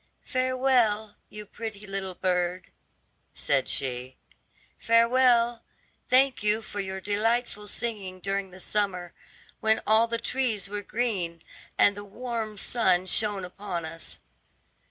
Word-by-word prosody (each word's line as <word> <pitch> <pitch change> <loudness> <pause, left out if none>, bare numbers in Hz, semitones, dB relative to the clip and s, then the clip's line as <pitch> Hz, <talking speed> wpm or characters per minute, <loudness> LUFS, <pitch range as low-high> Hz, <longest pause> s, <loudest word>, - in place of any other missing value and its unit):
"Farewell, 255 -5 +1
you 210 0 -8
pretty 210 0 -7
little 195 -2 -4
bird," 180 0 -1 0.6
said - - +1
she, 130 0 -1 0.6
"farewell; 235 0 +4 0.5
thank 260 0 +4
you 210 +1 +1
for 205 - -6
your 190 -1 -3
delightful 210 +2 0
singing 205 -5 -3
during 195 0 -2
the 185 +1 -13
summer, 185 -3 -1 0.5
when 220 0 +3
all 220 +2 +5
the 230 0 -1
trees 230 -5 -1
were 205 +1 -4
green, 200 -8 -2 0.3
and 205 - +5
the 205 - -7
warm 220 0 -4
sun 190 -5 +2
shone 200 0 +1
upon 180 -2 -5
us." 165 +1 -6
210 Hz, 120 wpm, -27 LUFS, 190-230 Hz, 0.6 s, all